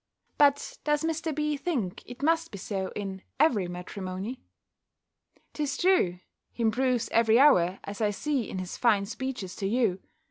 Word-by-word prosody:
But 285 -1 +3
does 295 0 +1
Mr. 325 0 -1
B. 300 0 0
think 265 - -2
it 245 +3 -9
must 330 +1 +2
be 200 - -8
so 190 0 -3
in 195 -2 -5 0.2
every 240 - +3
matrimony? 185 +6 -6 1.1
'Tis 290 -2 -2
true, 360 - +3 0.3
he 235 - -4
improves 245 +1 +1
every 230 0 +4
hour, 190 -11 +5
as 200 +2 -7
I 210 - +3
see 255 +3 -1
in - - -5
his 185 -1 -5
fine 210 -5 +3
speeches 230 -4 -5
to 195 - -1
you. 215 -4 +1
230 Hz, 155 wpm, -28 LUFS, 195-290 Hz, 1.1 s, hour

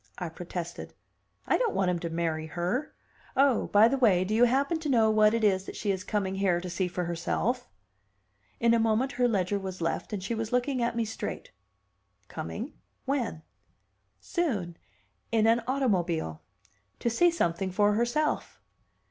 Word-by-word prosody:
I 175 -3 -4
protested. 170 +1 -7 0.5
"I - - +2
don't 475 -4 0
want 185 -2 +2
him 175 - -1
to 170 - -4
marry 165 -1 -2
her. 180 - -2 0.4
Oh, 275 -3 +3
by 210 +2 +6
the 270 +3 0
way 195 -8 +4
do 195 +3 -2
you 235 +3 +6
happen 280 +7 +1
to 310 -2 -4
know 225 -4 +4
what 215 0 +4
it 230 - -1
is 190 -2 +2
that - - -8
she 205 - -1
is 190 -1 -3
coming 195 -1 -1
here 190 -3 +1
to 180 0 -6
see 185 +1 0
for 180 0 -3
herself?" 185 +9 -1 0.9
In 235 0 +4
a 230 - +4
moment 225 +4 +2
her 245 0 +2
ledger 200 -3 0
was 190 -1 -6
left, 165 - -2
and 200 -3 -4
she 215 - -2
was 225 -1 -3
looking 250 +1 0
at 235 0 0
me 230 -1 0
straight. 225 - -6 0.8
Coming? - - -5 0.3
When? 245 - -2 0.8
"Soon. 220 - -2 0.6
In 225 -1 +3
an 230 +1 +4
automobile. 180 - 0 0.6
To - - -3
see 350 +10 +4
something 190 - 0
for 205 +2 +3
herself." 240 +8 0
215 Hz, 175 wpm, -28 LUFS, 180-245 Hz, 0.9 s, by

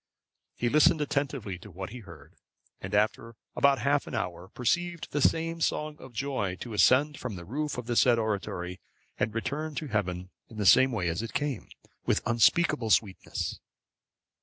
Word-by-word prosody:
He 120 - -1
listened 150 +4 +5
attentively 140 -10 -2
to 105 - -12
what 95 +1 -7
he 125 - -7
heard, 85 -9 -14 0.5
and 95 +2 -4
after 110 +2 0 0.2
about 140 -1 +4
half 140 +1 +1
an - - -5
hour, 90 -4 -3
perceived 170 - -1
the 145 - -1
same 165 +3 +1
song 150 -1 0
of 130 - -11
joy 120 -7 -2
to 120 - -6
ascend 140 +7 +4
from 120 -5 -5
the 85 -1 -8
roof 150 - -3
of 125 - -4
the 120 0 -2
said 120 0 +5
oratory, 95 -5 -3 0.4
and 110 - +1
to - - -17
return 150 +6 -3
to 150 -1 -4
heaven 95 -4 -2 0.2
in 110 - -12
the 105 - -1
same 130 +7 +7
way 100 -7 -1
as 85 +4 -1
it 115 - -6
came, 140 -4 -2 0.3
with - - +1
unspeakable 120 +2 +3
sweetness. 100 -3 0
120 Hz, 180 wpm, -28 LUFS, 100-145 Hz, 0.5 s, same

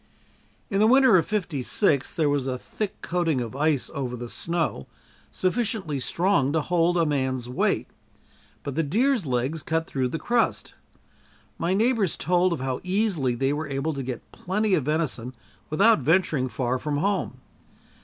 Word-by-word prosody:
In 195 - +1
the 215 - +5
winter 260 -2 +6
of 170 - +1
'56, 155 - 0
there 160 -3 +2
was 145 -2 0
a 130 -1 -2
thick 205 +9 -5
coating 170 -5 0
of 120 0 -5
ice 150 -1 +1
over 130 -3 -3
the 120 -1 -7
snow, 165 - -2 0.4
sufficiently 190 - -1
strong 170 -1 +1
to 160 - +2
hold 175 +2 +1
a 165 - +3
man's 130 -4 -1
weight, 125 - 0 0.8
but 140 - -4
the 160 - +1
deers' 220 - +1
legs 130 +5 -1
cut 160 +2 -1
through 130 -4 -1
the 130 - -3
crust. 240 +6 0 0.9
My 175 +3 +1
neighbors 220 -4 +1
told 180 +1 +2
of 165 - -2
how 130 -1 -2
easily 180 - 0
they 135 +3 0
were 150 +1 -3
able 140 +3 -2
to 140 - -4
get 125 -2 -6
plenty 205 +3 -1
of 155 -8 +2
venison 140 -5 -2 0.3
without 200 +6 +4
venturing 150 -3 +1
far 125 0 -1
from 145 +1 -2
home. 200 +6 -1
155 Hz, 165 wpm, -25 LUFS, 135-185 Hz, 0.9 s, winter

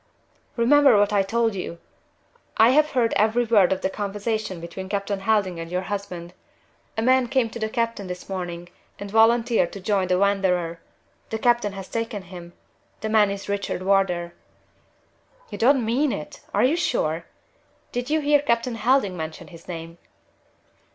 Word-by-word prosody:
"Remember 270 0 +5
what 205 0 +2
I 200 - +4
told 225 +3 0
you. 180 -3 -5 0.8
I 225 +2 +7
have 305 +3 +4
heard 240 -3 +2
every 220 +3 +2
word 210 -5 +4
of 190 - 0
the 190 - 0
conversation 205 -1 -3
between 170 +3 -7
Captain 200 0 -2
Helding 195 -4 0
and 165 0 -6
your 180 +1 -2
husband. 185 -3 -6 0.6
A 220 - 0
man 255 0 +3
came 245 -3 +1
to 235 - -7
the 220 -1 -2
captain 230 -4 -2
this 180 0 -7
morning 175 -2 -5 0.3
and 200 0 -8
volunteered 225 -3 +3
to 200 - -7
join 195 -1 0
the 180 0 +2
Wanderer. 180 -4 +1 0.5
The 220 - -2
captain 235 -3 +2
has 195 -1 -8
taken 225 -3 -4
him. 175 -1 -11 0.5
The 220 - -3
man 215 -2 +4
is 200 0 -5
Richard 200 -2 -3
Wardour." 185 -3 +1 1.2
"You - - -6
don't 255 0 +4
mean 260 +6 +1
it! 150 - -6
Are - - +2
you 265 +6 +3
sure? 170 - -1 0.7
Did 245 +2 -3
you 310 +1 +1
hear 290 0 +4
Captain 235 -2 0
Helding 225 -4 +2
mention 160 -1 -7
his 170 -2 -14
name?" 165 -1 -8
205 Hz, 165 wpm, -24 LUFS, 185-235 Hz, 1.2 s, I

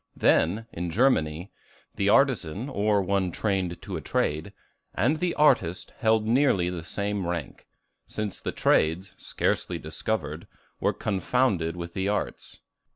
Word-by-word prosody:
Then, 100 +8 +3
in 85 +1 -3
Germany, 85 - +1 0.4
the 100 0 +1
artisan, 125 - +2
or 105 -4 +1
one 95 -1 0
trained 95 -3 -1
to 95 -3 -4
a - - -6
trade, 80 +5 -1 0.4
and 140 +11 +2
the 180 -1 0
artist, 95 - +2
held 110 -3 +3
nearly 110 -7 +3
the 85 -3 -5
same 100 +1 -2
rank; 85 -5 -5 0.4
since 105 -2 -4
the - - -3
trades, 80 +5 +1
scarcely - - -1
discovered, 80 -7 -3 0.3
were - - +2
confounded 95 -4 0
with 85 -1 -6
the 95 +1 -1
arts. 105 - -3
95 Hz, 135 wpm, -26 LUFS, 85-110 Hz, 0.4 s, Then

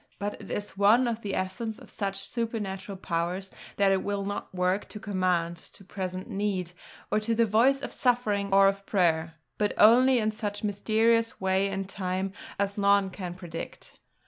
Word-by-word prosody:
But 205 +1 -4
it - - -11
is 205 0 -4
of 230 +3 +4
the 200 -3 -3
essence 215 +4 -3
of - - -14
such 195 -1 -3
supernatural 210 -4 -4
power 170 0 -1 0.4
that 200 -1 +4
it 190 -1 +2
will 200 -1 -2
not 205 0 -4
work 185 +2 0
to 210 - -7
command, 180 -4 0
to 195 - -12
present 185 -1 -5
need, 195 -3 -2 0.4
to 215 +2 +1
the 230 +1 +4
voice 245 +6 +3
of - - -4
suffering 215 -6 +1
or 195 0 +7
of 195 0 0
prayer; 165 -4 +1 0.2
but 210 -1 +1
only 250 +4 +7
in 215 -2 +1
such 210 -1 -4
mysterious 225 +3 +2
way 190 +1 +2
and 195 -1 -3
time 190 0 -3 0.2
as 200 0 -1
none 200 -1 +3
can 180 -2 -6
predicate. 175 -3 -8
200 Hz, 170 wpm, -28 LUFS, 185-215 Hz, 0.4 s, or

